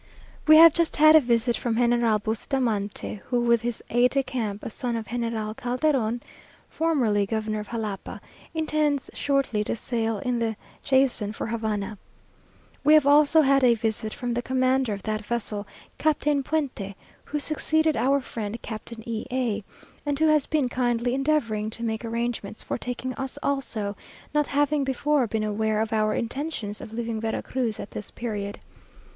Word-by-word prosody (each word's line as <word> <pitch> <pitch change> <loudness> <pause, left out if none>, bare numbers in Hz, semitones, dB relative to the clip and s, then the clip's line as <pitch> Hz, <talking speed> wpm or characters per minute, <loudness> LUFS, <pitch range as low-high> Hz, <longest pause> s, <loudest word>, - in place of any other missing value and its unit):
We 310 - +9
have 325 0 +9
just 335 -1 +1
had 310 +1 +7
a - - +10
visit 235 -1 +2
from 230 -2 -1
General 235 -2 +3
Bustamante, 215 -2 -2
who, 245 -1 +1
with 235 -1 +3
his 240 -1 -3
aide 245 +1 +4
de 275 +1 +1
camp, 230 -5 -3
a - - -4
son 240 +1 -3
of 225 -1 -3
General 230 -2 -2
Calderon 250 -1 0 0.5
(formerly 240 -11 +1
governor 215 0 -2
of 210 - -6
Jalapa), 215 -4 -4 0.4
intends 305 -3 0
shortly 275 -7 0
to - - -2
sail 225 -1 -1
in 245 +4 -1
the 225 -1 -1 0.3
Jason 260 -6 +2
for - - -4
Havana. 215 -3 -3 0.8
We 305 +1 +7
have 305 -3 +5
also 295 +2 +6
had 275 -2 +4
a 240 -2 +6
visit 220 -1 -2
from 245 +1 -3
the 240 - -1
commander 260 -1 +1
of 200 - -7
that 215 0 -2
vessel, 210 -2 -2 0.3
Captain 300 -2 +2
Puente, 265 -10 -2 0.3
who 300 - -3
succeeded 315 +1 +1
our 275 +2 +2
friend 225 -2 -5
Captain 225 +1 -8
E 225 -1 -3
a; 240 -5 -1 0.4
and 290 -1 -1
who 315 - +3
has 305 -3 +3
been 300 -4 +1
kindly 245 -1 0
endeavouring 255 -7 0
to 230 +1 -6
make 220 0 -2
arrangements 230 -2 -3
for - - -3
taking 250 +1 -4
us 265 +1 -4
also, 230 -7 -2 0.4
not 295 -1 +2
having 290 0 +1
before 270 0 +1
been 220 0 -1
aware 215 0 0
of 220 0 -1
our 215 -1 +2
intentions 235 -4 -3
of - - -9
leaving 225 -1 -3
Vera 225 0 -2
Cruz 245 -5 -2
at - - -7
this 210 - -6
period. 205 -4 -4
240 Hz, 170 wpm, -25 LUFS, 220-275 Hz, 0.8 s, a